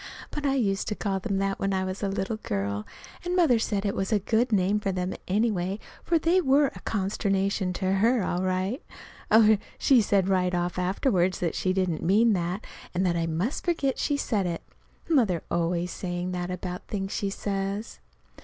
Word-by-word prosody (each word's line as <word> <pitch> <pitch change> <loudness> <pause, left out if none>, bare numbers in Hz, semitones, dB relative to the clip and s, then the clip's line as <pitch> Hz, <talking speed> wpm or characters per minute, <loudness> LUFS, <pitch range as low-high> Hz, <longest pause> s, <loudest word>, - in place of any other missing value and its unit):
But 295 -1 -2
I 275 - +2
used 200 -6 0
to 210 - -1
call 195 -2 -1
them 195 0 -2
that 195 0 -1
when 195 0 0
I 190 - 0
was 185 +1 -4
a 200 - 0
little 195 +3 -2
girl, 100 - -3 0.4
and 355 +1 -1
Mother 315 -10 +4
said 210 -2 -1
it 200 - 0
was 195 +4 -2
a 215 - +4
good 225 +4 +1
name 200 0 +2
for 195 -2 -1
them, 180 0 -2
anyway, 195 -2 0 0.3
for 340 - +2
they 335 +4 +3
were 280 -1 +4
a - - -10
consternation 195 -1 0
to 185 0 -1
her 225 +3 +3
all 180 0 -1
right. 185 - -1 0.5
Oh, 220 0 +6 0.2
she 260 -4 +5
said 195 -2 +2
right 180 -2 +2
off 175 +1 -1
afterward 185 0 +1
that 170 -3 -2
she 185 - 0
didn't 185 -4 0
mean 215 +5 +4
that, 180 +2 -2 0.3
and 185 +2 +2
that 175 -2 +2
I 165 -1 0
must 175 - -2
forget 305 -6 0
she 290 - +1
said 205 -9 0
it. 170 -1 -4 0.4
Mother's 225 - +2
always 175 +1 0
saying 175 0 -3
that 180 0 -3
about 180 0 -5
things 195 -1 -3
she 200 - -1
says. 195 +1 -3
195 Hz, 195 wpm, -27 LUFS, 180-220 Hz, 0.5 s, Oh